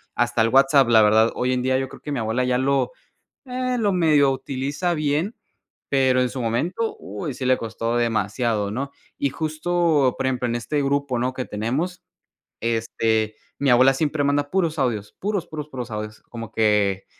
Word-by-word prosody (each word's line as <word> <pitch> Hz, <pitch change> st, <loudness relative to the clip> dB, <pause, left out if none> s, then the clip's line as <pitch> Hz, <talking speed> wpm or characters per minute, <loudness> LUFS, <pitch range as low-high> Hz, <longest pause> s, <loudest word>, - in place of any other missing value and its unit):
hasta 120 Hz, -1 st, +1 dB
el 115 Hz, -, +3 dB
WhatsApp. 135 Hz, 0 st, +5 dB
La 115 Hz, -2 st, +7 dB
verdad, 110 Hz, +2 st, +4 dB
hoy 125 Hz, +1 st, 0 dB
en 125 Hz, -, 0 dB
día 130 Hz, +1 st, +1 dB
yo 135 Hz, 0 st, -2 dB
creo -, -, -13 dB
que 150 Hz, -, -6 dB
mi 135 Hz, -, -1 dB
abuela 115 Hz, +3 st, 0 dB
ya 125 Hz, 0 st, +1 dB
lo 135 Hz, -, +1 dB, 0.5 s
ah, 255 Hz, 0 st, -2 dB
lo 210 Hz, -3 st, +2 dB
medio 150 Hz, -6 st, +4 dB
utiliza 140 Hz, +6 st, -2 dB
bien, 155 Hz, +7 st, -1 dB, 0.5 s
pero, 130 Hz, -2 st, +3 dB
en 125 Hz, -, +2 dB
su 130 Hz, -, -5 dB
momento, 170 Hz, -, -1 dB
uy, 160 Hz, -6 st, -5 dB
sí 130 Hz, -, -5 dB
le 130 Hz, 0 st, +4 dB
costó 115 Hz, +1 st, -3 dB
demasiado, 110 Hz, -2 st, 0 dB
¿no?, 135 Hz, +6 st, -3 dB, 0.3 s
y 140 Hz, -, 0 dB
justo, 155 Hz, -2 st, +1 dB
por -, -, 0 dB
ejemplo, 125 Hz, -1 st, 0 dB
en 120 Hz, -, -1 dB
este 145 Hz, +5 st, -1 dB
grupo, 140 Hz, -2 st, 0 dB
¿no?, 125 Hz, +2 st, 0 dB
que 130 Hz, 0 st, -4 dB
tenemos, 135 Hz, -, -3 dB, 0.6 s
este, 110 Hz, -1 st, 0 dB, 0.2 s
mi 140 Hz, -, +1 dB
abuela 130 Hz, +2 st, +6 dB
siempre 145 Hz, +1 st, 0 dB
manda 145 Hz, 0 st, +1 dB
puros 170 Hz, -4 st, 0 dB
audios, 110 Hz, -6 st, -1 dB
puros, 200 Hz, -3 st, -2 dB
puros, 150 Hz, -2 st, -6 dB
puros 125 Hz, -4 st, -6 dB
audios, 105 Hz, 0 st, -6 dB
como 115 Hz, -2 st, -7 dB
que 105 Hz, -3 st, +2 dB
130 Hz, 185 wpm, -23 LUFS, 115-150 Hz, 0.6 s, La